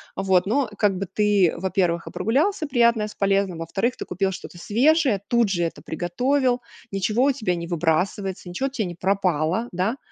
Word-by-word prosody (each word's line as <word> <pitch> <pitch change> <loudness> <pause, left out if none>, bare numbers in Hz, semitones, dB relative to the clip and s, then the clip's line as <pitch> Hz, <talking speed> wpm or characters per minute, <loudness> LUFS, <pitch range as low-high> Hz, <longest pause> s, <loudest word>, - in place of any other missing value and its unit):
Вот. 190 -2 +2
Ну, 255 +5 +1
как 205 -3 +2
бы, 195 - -2
ты, 205 -5 +3
во-первых, 180 -2 0
и - - -6
прогулялся 300 - 0
приятное 235 -5 +3
с 210 - -12
полезным, 195 -3 +1
во-вторых, 195 +9 -1
ты - - -5
купил 190 +2 -1
что-то 180 -1 -9
свежее, 255 - +2
тут 235 -3 +2
же 175 -3 0
это 165 - -4
приготовил, 250 - 0 0.3
ничего 210 +5 +1
у 285 - +4
тебя 215 -10 -1
не 170 0 -5
выбрасывается, 180 +3 -1
ничего 185 +10 -2
у - - -4
тя 255 -5 -2
не 175 -1 -6
пропало, 185 +1 0
да. 185 +8 -1
195 Hz, 185 wpm, -23 LUFS, 180-235 Hz, 0.3 s, у